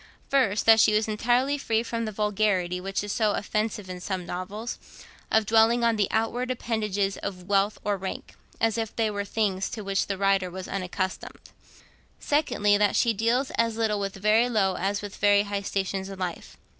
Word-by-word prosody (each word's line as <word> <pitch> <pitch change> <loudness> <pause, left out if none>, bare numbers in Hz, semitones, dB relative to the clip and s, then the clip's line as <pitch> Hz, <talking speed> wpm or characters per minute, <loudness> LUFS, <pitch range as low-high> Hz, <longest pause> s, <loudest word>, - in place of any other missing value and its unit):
First, 235 -7 +2
that 225 0 +7
she 215 - +5
is 215 +1 +2
entirely 245 +6 +1
free 225 -4 0
from 230 -1 -3
the 215 - -3
vulgarity, 200 -4 0
which 195 +1 -2
is 205 - -4
so 215 -3 +1
offensive 210 -1 -2
in 180 -1 -7
some 185 -1 -3
novels, 200 +7 -5 0.5
of 220 -1 +3
dwelling 225 +2 +4
on 230 -1 +3
the 205 -2 +1
outward 240 +3 -1
appendages 210 -5 -1
of 180 -2 -6
wealth 200 +2 +1
or 205 -1 0
rank, 190 0 -6 0.3
as 225 0 +1
if 225 -1 -4
they 220 -2 +1
were 200 -1 -3
things 195 -2 -1
to 215 - -6
which 195 0 0
the 195 - -2
writer 195 -1 +2
was 185 +1 -7
unaccustomed; 185 0 -4
and, - - -22 0.4
secondly, 210 -9 +2
that 210 -1 +2
she 235 -2 +3
deals 235 +5 0
as 230 -1 +1
little 215 -2 +1
with 195 -1 -3
very 215 +5 +3
low 195 -5 +1
as 200 +3 -2
with 205 -1 -7
very 205 0 +4
high 200 -1 -3
stations 195 -1 -2
in 195 - -8
life. 180 -2 -5
210 Hz, 195 wpm, -26 LUFS, 195-225 Hz, 0.5 s, that